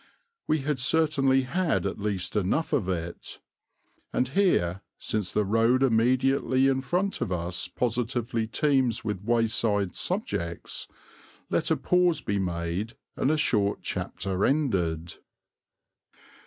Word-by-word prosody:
We 155 -2 +1
had 145 -1 -1
certainly 135 -2 +3
had 170 - 0
at 100 - -3
least 100 -2 -2
enough 105 - 0
of 110 -11 +1
it. 85 -1 -4 0.7
And 125 - 0
here, 115 - +2 0.2
since 105 -4 -2
the 105 - +1
road 115 +5 +3
immediately 130 +2 +3
in 135 -1 +2
front 180 +9 -1
of 95 - -1
us 90 +1 -2
positively 115 +1 -1
teems 130 -3 +1
with 105 -3 -3
wayside 110 -4 +1
subjects, 85 0 -3 0.6
let - - +1
a - - +2
pause 180 -3 +2
be 100 -1 -1
made 90 +4 -2 0.2
and 130 - +1
a 155 - +2
short 105 -8 +1
chapter 95 0 -3
ended. 90 - 0
115 Hz, 125 wpm, -27 LUFS, 95-135 Hz, 0.7 s, certainly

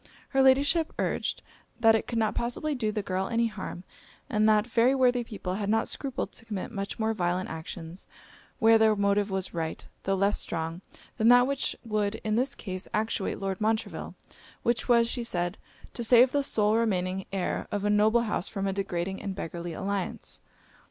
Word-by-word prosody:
Her 270 - +3
Ladyship 285 +5 +4
urged - - -1 0.4
'That 225 -1 +6
it 220 - 0
could 235 - -2
not 220 -1 +1
possibly 245 +6 -2
do 225 -6 -1
the 210 -1 -3
girl 190 0 -1
any 235 0 +1
harm; 190 -5 -5 0.5
and 215 -1 +3
that 210 0 +4
very 245 +2 +3
worthy 250 -2 +3
people 200 -5 -5
had 200 +1 -2
not 225 +1 +2
scrupled 270 -2 -3
to - - -8
commit 210 -3 -4
much 200 -3 -4
more 220 0 0
violent 180 -2 -1
actions 160 +2 -7 0.5
where 225 0 +6
their 220 -1 +5
motive 200 0 +1
was 190 -1 -2
right, 165 -2 -4 0.2
tho' 195 - 0
less 200 +2 +1
strong, 165 +2 -3 0.4
than 220 -1 +3
that 245 +1 +7
which 275 +1 0
would 210 -1 0
in 215 -1 0
this 265 +4 0
case 185 -2 -6
actuate 215 -1 -1
Lord 195 0 -3
Montreville, 220 +1 -1 0.5
which 235 +1 0
was,' 235 -1 +5
she 240 +1 -2
said, 175 -4 -2 0.3
'to 240 - -4
save 245 +2 +6
the 285 -1 +1
sole 215 -4 +2
remaining 190 -4 0
heir 195 -2 -2
of 205 0 -2
a - - +2
noble 215 +3 +4
house 210 -4 -1
from 195 -2 -3
a 195 - 0
degrading 190 -1 -3
and 195 -2 -4
beggarly 170 -2 -5
alliance.' 195 +2 -3
215 Hz, 185 wpm, -28 LUFS, 190-235 Hz, 0.5 s, that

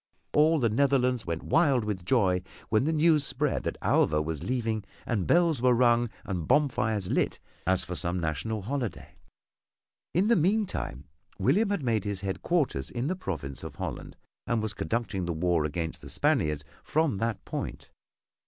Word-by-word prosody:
All 155 +2 +5
the 125 -6 +2
Netherlands 125 -1 +2
went 85 -1 -3
wild 140 -8 +3
with 100 -4 -3
joy 95 -4 +2 0.3
when 110 +4 +2
the 160 - +2
news 155 -1 +4
spread - - 0
that - - -2
Alva 75 0 +3
was 75 -1 -3
leaving 115 0 -1 0.2
and 105 -7 -1
bells 170 -6 +3
were 125 -1 +4
rung 120 -1 +3 0.2
and 90 -6 -3
bonfires 110 -9 +1
lit - - +1 0.3
as 95 0 +3
for 90 - -5
some 90 +1 -1
national 85 +7 -2
holiday. 125 -3 -4 1.0
In 185 +4 +3
the 235 - +5
meantime 185 - 0 0.3
William 200 - +2
had 200 -7 -1
made 115 -4 +1
his 100 -2 -3
headquarters 100 - -1
in 120 +5 -2
the 185 - 0
province 75 - -5
of - - -7
Holland - - -6 0.3
and 115 - +1
was 110 0 -2
conducting 95 +1 -2
the 85 - -1
war 85 -1 +1
against 80 +1 -3
the - - -9
Spaniards 75 -1 +1 0.2
from 155 -8 +1
that 115 -1 -2
point. - - -5
110 Hz, 165 wpm, -28 LUFS, 90-140 Hz, 1.0 s, All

